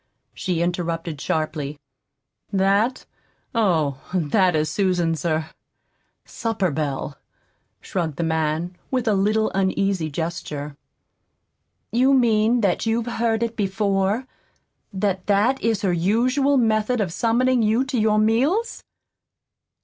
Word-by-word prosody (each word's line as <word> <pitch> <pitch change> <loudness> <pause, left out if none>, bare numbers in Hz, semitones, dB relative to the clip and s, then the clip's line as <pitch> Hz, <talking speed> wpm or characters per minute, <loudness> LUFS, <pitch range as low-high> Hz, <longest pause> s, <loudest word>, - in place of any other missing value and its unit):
she 175 -3 -1
interrupted 170 -3 -3
sharply. 155 -2 -2 0.7
"That? 200 +6 +1 0.5
Oh, 165 - +1 0.2
that 180 +2 +2
is 155 0 +1
Susan's 175 -6 0
er 160 -2 -1 0.7
supper 210 -6 -2
bell," 140 -1 -3 0.6
shrugged 165 -6 -3
the 170 - -2
man, 160 +2 -1
with 255 -3 -1
a 215 - +4
little 215 +3 +1
uneasy 190 -3 0
gesture. 150 -2 -5 1.2
"You 260 +3 +4
mean 230 -1 +3
that 200 +1 0
you've 225 +1 0
heard 230 -1 0
it 230 0 -3
before? 200 +2 0 0.7
that 190 -2 -2
that 210 +7 +2
is 225 -2 0
her 185 -3 +2
usual 250 +11 +2
method 225 0 +1
of 185 -6 -1
summoning 240 +4 +2
you 220 +4 +2
to 265 -3 -1
your 215 0 +3
meals?" 265 - +1
195 Hz, 115 wpm, -22 LUFS, 165-230 Hz, 1.2 s, a